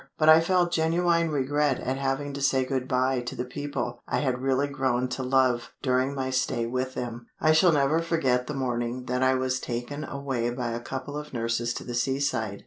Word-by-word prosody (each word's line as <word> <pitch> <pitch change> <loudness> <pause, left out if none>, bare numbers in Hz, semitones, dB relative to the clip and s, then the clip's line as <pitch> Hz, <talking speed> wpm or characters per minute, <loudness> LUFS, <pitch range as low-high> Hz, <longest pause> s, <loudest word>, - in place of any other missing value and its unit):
But 155 0 +4
I 160 +1 +9
felt 175 0 +2
genuine 170 0 +2
regret 145 -1 +1
at 130 +1 -2
having 140 +1 -2
to 140 - -5
say 135 -1 +2
good 130 -1 -2
bye 130 -1 +1
to 120 - -6
the 125 - -3
people 125 -2 -4
I 120 - 0
had 130 -2 -1
really 135 +1 +1
grown 130 -3 0
to 125 - -3
love 130 -2 +2
during 130 +1 +1
my 130 -1 -2
stay 130 -2 0
with 130 +2 -2
them. 120 -1 -5
I 155 - +4
shall 165 +3 +5
never 145 +1 +3
forget 135 -7 +1
the 150 - -4
morning 125 -1 -2
that 125 +1 -1
I 130 0 +4
was 130 0 0
taken 125 +5 -4
away 135 -5 -2
by 120 -1 -3
a 115 - -3
couple 130 +4 -6
of 150 -2 -6
nurses 115 0 -1
to - - -5
the 120 - -6
seaside. 120 -5 -1
130 Hz, 210 wpm, -27 LUFS, 125-145 Hz, -, I